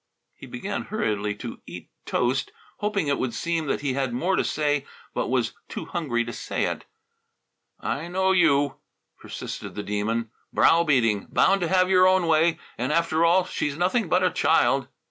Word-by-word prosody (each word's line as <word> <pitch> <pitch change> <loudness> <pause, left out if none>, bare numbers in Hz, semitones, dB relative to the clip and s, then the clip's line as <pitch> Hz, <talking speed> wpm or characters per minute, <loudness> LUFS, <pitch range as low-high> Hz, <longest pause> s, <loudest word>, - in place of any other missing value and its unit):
He - - -12
began 190 +12 -4
hurriedly 105 - -1
to 105 - -8
eat - - -10 0.2
toast, 130 +2 0 0.3
hoping 205 -4 -1
it 140 - +1
would 120 -3 -2
seem 165 +2 -1
that 135 - -1
he 140 -2 -1
had 135 -2 -1
more 175 +10 +1
to - - +1
say 145 -2 0 0.3
but - - -1
was - - 0 0.2
too - - -5
hungry 120 -9 -1
to 120 - -6
say - - -3
it. - - -4 0.9
"I 155 +5 -3
know 190 +2 +1
you," 145 -6 +3 0.4
persisted - - -7
the 105 - -4
Demon. 110 +2 -2 0.2
"Brow 165 +1 +4
beating, 115 -10 +2
bound 195 0 +3
to 175 - +1
have 185 +1 +3
your 185 -1 +5
own 185 -1 +3
way, 165 +1 +3 0.2
and, 125 +4 -1
after 165 0 +2
all, 175 +2 +4
she's 150 -5 -3
nothing 185 +3 +1
but 180 +2 +3
a 185 - +3
child." - - +2
155 Hz, 180 wpm, -25 LUFS, 125-180 Hz, 0.9 s, your